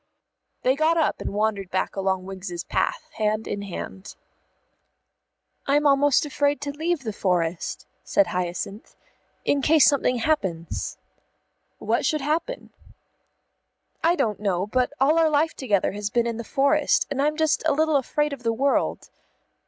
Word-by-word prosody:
They 260 +1 +3
got 315 +3 +2
up 320 - +1
and - - -3
wandered 205 -2 -1
back 185 - -2
along 190 -1 -1
Wiggs's 185 -2 -6
path, - - -1
hand 215 0 0
in 205 - -3
hand. 195 0 -7 1.5
"I'm 290 +2 +3
almost 285 0 +4
afraid 285 0 0
to 285 0 -3
leave 315 +1 -2
the 220 -3 -4
forest," 175 -4 -1 0.2
said 200 - +3
Hyacinth, 180 +4 -4 0.5
"in 285 - +2
case 305 0 +5
something 275 -3 +3
happens." 195 - -2 0.8
"What - - 0
should 305 -2 +1
happen?" 325 - -2 1.3
"I 335 +2 +4
don't 230 - -1
know; 190 -3 0
but 250 +5 0
all 300 +5 +4
our 325 -1 +4
life 310 +2 +2
together 205 -8 0
has 205 +1 -4
been 235 +1 +1
in 230 -1 -2
the 235 - -5
forest, 280 +5 +2
and 275 -1 0
I'm 300 +1 +1
just 315 -1 +2
a - - +4
little 310 +1 +2
afraid 295 +2 -1
of 275 - -8
the 230 -1 0
world." 275 +4 0
260 Hz, 155 wpm, -24 LUFS, 200-295 Hz, 1.5 s, case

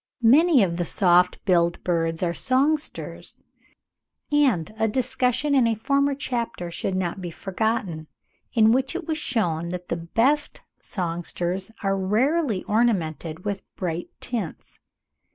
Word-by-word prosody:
Many 280 - +6
of 170 -3 -1
the 175 - 0
soft 180 0 +3
billed 170 -3 +2
birds 165 -1 0
are 170 -1 +1
songsters; 280 - -1 0.9
and 255 - +2
a 220 - +3
discussion 255 +4 0
in 260 -4 +4
a 225 - +1
former 280 +5 +1
chapter 235 -10 -3
should 185 +2 -3
not 185 +1 -2
be 175 - -4
forgotten, 190 -3 -2 0.4
in 220 -3 +5
which 265 +6 +1
it 355 -2 -4
was 315 -1 -1
shewn 170 - -1
that 180 0 -6
the 170 - -1
best 235 - 0 0.2
songsters 175 +1 -3
are 195 0 +1
rarely 220 - +1
ornamented 180 -7 0
with 200 -2 -2
bright 175 -2 -3
tints. 225 -10 -5
205 Hz, 135 wpm, -24 LUFS, 175-255 Hz, 0.9 s, Many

